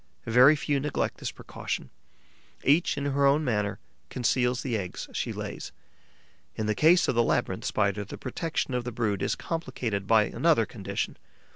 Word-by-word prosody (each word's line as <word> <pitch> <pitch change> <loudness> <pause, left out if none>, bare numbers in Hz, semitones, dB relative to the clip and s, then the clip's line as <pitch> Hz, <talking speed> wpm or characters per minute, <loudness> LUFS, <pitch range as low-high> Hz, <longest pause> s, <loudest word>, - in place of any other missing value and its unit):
Very 125 +6 +7
few 145 -1 0
neglect 145 +1 -2
this - - -3
precaution; - - -6 0.7
each, 150 +2 +3
in 140 - -2
her 140 0 +3
own 145 +3 +3
manner, 105 -5 0 0.3
conceals 125 0 +1
the 125 -4 -1
eggs 95 -4 -4
she - - -2
lays. - - -6 0.8
In 110 - -2
the 110 - +1
case 160 - +5
of - - +2
the 120 - +3
Labyrinth 115 - 0
Spider, 100 +1 0
the 100 - -9
protection 145 +1 -3
of 125 -1 0
the 125 - -4
brood 110 -4 -1
is - - 0
complicated 125 - -3
by 110 -1 +5
another - - +2
condition. - - -4
125 Hz, 165 wpm, -27 LUFS, 110-140 Hz, 0.8 s, Very